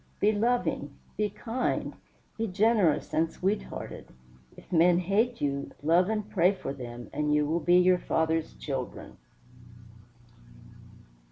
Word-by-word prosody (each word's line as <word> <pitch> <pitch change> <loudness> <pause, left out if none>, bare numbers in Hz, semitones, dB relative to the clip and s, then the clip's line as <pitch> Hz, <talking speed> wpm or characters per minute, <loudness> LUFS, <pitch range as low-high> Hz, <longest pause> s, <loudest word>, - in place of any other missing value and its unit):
Be 210 - +4
loving, 205 - -1 0.2
be 210 -1 0
kind, 235 +5 -2 0.4
be 225 0 -2
generous 200 -5 +2
and 160 0 +1
sweet 195 +3 -1
hearted; - - -8 0.5
if - - -16
men 175 0 +5
hate 210 +7 0
you, 140 -1 -1
love 175 +5 +3
and 210 -2 -2
pray 185 -1 +3
for 185 - -5
them; 120 -2 -8
and 150 0 +1
you 150 0 +2
will 160 +3 0
be 175 +3 +4
your 180 0 +4
Father's 160 -1 -1
children." 135 -4 -6
175 Hz, 135 wpm, -28 LUFS, 150-210 Hz, 0.5 s, men